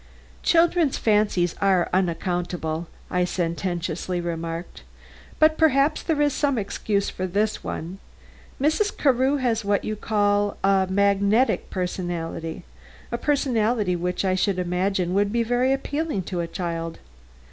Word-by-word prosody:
"Children's 335 -3 +3
fancies 210 -5 +2
are 190 -3 +3
unaccountable," 175 -2 -1 0.2
I 180 0 +2
sententiously 175 0 -2
remarked; 170 0 -5 0.6
"but 310 0 +4
perhaps 300 -1 +3
there 320 -3 -1
is 290 -2 +2
some 280 -3 +1
excuse 200 -1 -1
for 185 - -3
this 205 +4 -1
one. 175 +4 -5 0.6
Mrs. 315 +9 +1
Carew 265 0 +3
has 235 -4 0
what 200 -1 +1
you 215 - -2
call 205 -1 +1
magnetism 195 -1 +1
a 165 0 -5 0.6
personality 235 -8 +1
which 180 +2 -2
I 185 - +2
should 190 0 +1
imagine 180 0 0
would 200 +1 +2
be 235 +1 +1
very 245 +3 +1
appealing 285 - -1
to 180 0 -4
a 170 - -3
child. 165 -2 -4
200 Hz, 125 wpm, -24 LUFS, 180-245 Hz, 0.6 s, but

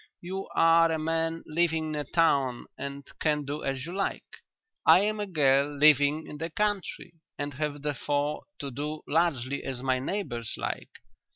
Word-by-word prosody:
"You 190 +2 -5
are 165 0 +5
a 160 - +1
man 165 +1 -1
living 160 0 +1
in - - -2
a 150 - -1
town 140 -5 +2
and 140 +1 -6
can 150 -2 +1
do 145 +2 -4
as 135 0 -2
you 170 - -6
like. 195 - -2 0.6
I - - +7
am 215 +1 0
a 205 - -2
girl 145 -4 +2
living 150 +1 +5
in 150 - -9
the 165 +1 -3
country 205 0 -1 0.2
and 145 0 -3
have 145 +1 -3
therefore 145 0 -1
to 140 -1 -5
do 150 +4 -4
largely 140 -4 +1
as 130 -1 -4
my 130 -1 +1
neighbours 125 - -3
like. - - -4
150 Hz, 170 wpm, -28 LUFS, 140-165 Hz, 0.6 s, I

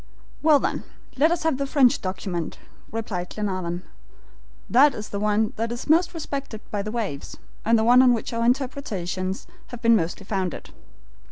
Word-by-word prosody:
"Well, 305 -1 +6
then, - - -2 0.3
let 300 +4 +4
us 345 - 0
have 320 -4 +1
the 275 - -1
French 270 -2 +4
document," 185 -3 -4 0.3
replied 200 -5 -3
Glenarvan. 185 -4 -3 0.8
"That 275 +3 +5
is 210 - -6
the 200 - -3
one 210 +1 +1
that 230 +1 -1
is 240 - -5
most 335 +3 +3
respected 275 -8 -5
by 205 - -1
the 210 - -4
waves, 210 -12 -4 0.3
and 230 +1 +4
the 220 - +2
one 245 +2 +7
on 255 -1 +6
which 235 0 -1
our 230 0 0
interpretations 210 -8 -1 0.2
have 245 -1 -10
been 230 0 +6
mostly 175 +1 -1
founded." 190 -3 -3
225 Hz, 170 wpm, -24 LUFS, 195-260 Hz, 0.8 s, one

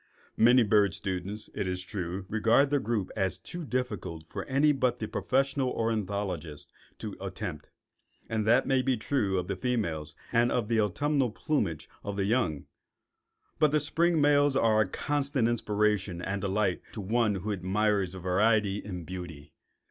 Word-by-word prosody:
Many 120 +2 +6
bird 105 -4 +3
students, 95 +3 -4
it 95 - -2
is 90 0 -3
true, 95 -1 -5
regard 115 +6 +3
the 145 - +3
group 110 -5 -2
as 95 -3 0
too 175 -1 -7
difficult 105 - -3
for - - -6
any 140 +3 +3
but 130 -3 +1
the 110 - -4
professional 135 +2 0
ornithologist 100 - -3 0.3
to - - -6
attempt; - - -6 0.6
and 110 -1 -1
that 120 +4 +5
may 135 -1 +2
be 130 -1 +1
true 110 -5 0
of 90 -1 -2
the 100 - -2
females 85 - -2 0.2
and 120 +1 +3
of 115 -3 0
the 115 -2 +3
autumnal 130 +5 +1
plumages 105 - -1 0.2
of 100 - -4
the 100 -1 0
young, 100 - 0 0.9
but 155 -1 +5
the 150 - +3
spring 165 +3 +2
males 145 -1 +4
are 110 -4 +4
a 105 - +1
constant 140 +2 0
inspiration 105 -5 0
and 95 +2 -3
delight 100 -1 0
to - - -6
one 110 +1 +1
who 100 +3 -3
admires 100 0 0
variety 100 +3 +2
in 90 -5 -6
beauty. 85 -5 -8
105 Hz, 160 wpm, -29 LUFS, 95-125 Hz, 0.9 s, Many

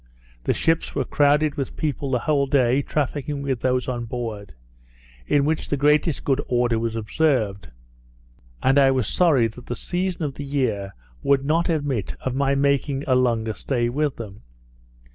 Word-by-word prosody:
The - - +2
ships 165 0 0
were 135 - 0
crowded 145 +2 +2
with 135 -3 -4
people 145 -2 -2
the 130 - +2
whole 140 +2 +1
day, 130 -1 +3
trafficking 145 0 -2
with 135 -3 -1
those 125 0 0
on 120 -2 -3
board, 110 - -6 0.7
in 145 -1 +3
which 155 +1 -1
the 145 - 0
greatest 150 +2 +2
good 140 0 +1
order 120 -2 +1
was 115 0 -2
observed; 110 - 0 0.9
and 135 +2 +4
I 135 -1 +6
was 130 -5 +1
sorry 155 -10 +3
that 120 +3 -13
the 120 - -3
season 180 +2 -2
of 145 -2 -2
the 145 - -7
year 120 -9 -2 0.3
would 140 -1 +2
not 165 +4 +1
admit 145 - -1
of 130 - -2
my 140 +1 +1
making 140 0 +1
a 135 - +2
longer 115 -3 +1
stay 120 0 -1
with 145 +2 -1
them. 105 -3 -9
135 Hz, 170 wpm, -23 LUFS, 120-145 Hz, 0.9 s, I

